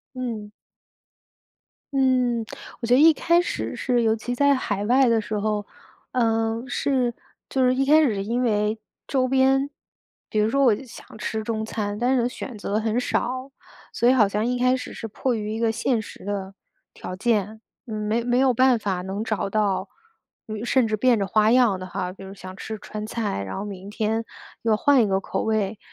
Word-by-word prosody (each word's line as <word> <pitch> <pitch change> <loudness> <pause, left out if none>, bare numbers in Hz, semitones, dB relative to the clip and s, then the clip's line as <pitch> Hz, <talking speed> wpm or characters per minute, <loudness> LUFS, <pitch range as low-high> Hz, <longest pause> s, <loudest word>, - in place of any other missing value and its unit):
嗯。 230 -5 -5 1.5
嗯， 250 -3 +2 0.4
我 230 - -3
觉 245 - +2
得 - - +5
一 320 +1 +8
开 340 +2 +3
始 350 - -3
是 245 -2 +1
尤 220 -1 +2
其 245 +2 -4
在 285 +2 +4
海 205 -7 -1
外 255 +3 +4
的 230 -1 +3
时 215 0 -3
候， 210 0 -1 0.5
嗯， 225 0 0
是 255 -5 0 0.3
就 265 -1 +1
是 255 - +4
一 270 +1 +1
开 310 +2 +6
始 265 -8 +3
是 195 - -2
因 240 +4 -1
为 210 -2 +1 0.3
周 260 -2 +1
边 270 +2 +3 0.6
比 215 - 0
如 215 +1 +2
说 275 +3 +3
我 235 -5 +5
想 240 -3 -13
吃 220 0 -3
中 220 -1 -2
餐， 210 -2 -3
但 250 +4 +2
是 240 -1 +2
选 250 -2 -7
择 210 +1 -1
很 220 +2 0
少， 255 +1 -1 0.4
所 240 - +2
以 - - +7
好 230 -5 +5
像 210 +2 -1
一 245 +1 0
开 255 +1 +3
始 255 - -7
是 225 - -6
迫 240 +3 -1
于 210 0 -3
一 225 - -4
个 230 -1 +2
现 225 0 0
实 205 - -12
的 195 -1 -4 0.4
条 185 - -7
件， 215 +1 0 0.3
嗯， 220 - -6
没 215 +2 -1
没 245 +1 +2
有 265 -1 +4
办 255 +1 +4
法 195 -5 -2
能 195 +3 -4
找 215 -3 -1
到， 195 -2 0 0.6
于 215 0 -5
甚 245 -1 +2
至 215 - 0
变 250 +2 +4
着 - - +1
花 215 +2 +4
样 240 -6 +4
的 185 - -7
哈， 180 0 -4
比 195 0 -12
如 195 +1 -9
想 185 0 -10
吃 220 - -6
川 215 0 -7
菜， 210 - -2
然 95 0 -6
后 - - -4
明 195 -1 -8
天 220 +2 -1 0.4
又 225 -2 +3
换 280 +3 +4
一 220 - +4
个 190 0 +1
口 - - -3
味。 215 -2 0
225 Hz, 220 characters per minute, -24 LUFS, 210-250 Hz, 1.5 s, 一